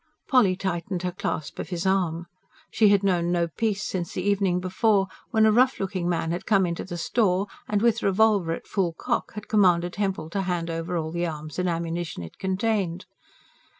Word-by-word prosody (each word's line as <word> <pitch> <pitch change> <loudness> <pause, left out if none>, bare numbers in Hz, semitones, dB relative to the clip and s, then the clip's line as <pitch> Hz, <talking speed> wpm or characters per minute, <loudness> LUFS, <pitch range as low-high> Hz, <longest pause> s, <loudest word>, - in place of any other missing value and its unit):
Polly 210 -9 +4
tightened 180 -1 -3
her 180 - -1
clasp 175 -4 -4
of - - -5
his 175 0 -3
arm. 175 -3 +1 0.5
She 215 -2 +4
had 200 -1 +4
known 175 -3 +1
no 170 -1 +1
peace 210 +3 -1
since 175 -3 -3
the 185 - -3
evening 195 -3 +2
before, 195 +2 +2 0.2
when 220 -3 +4
a 220 - +5
rough 255 +4 +3
looking 185 -3 -2
man 165 -1 0
had 175 +1 -4
come 195 -3 +4
into 170 -1 -3
the 175 -2 -6
store 190 +1 +1 0.2
and, 210 0 0
with 235 0 +3
revolver 200 -3 +3
at 165 - -4
full 180 -5 -1
cock, - - -2
had 210 0 -7
commanded 180 -4 +3
Hempel 190 -6 -2
to 195 - -1
hand 175 -3 -2
over 165 +2 -3
all 160 -1 -3
the 175 +1 -1
arms 155 0 -6
and 180 0 +1
ammunition 170 - -3
it 80 - -11
contained. 190 -2 -1
185 Hz, 195 wpm, -25 LUFS, 170-200 Hz, 0.5 s, a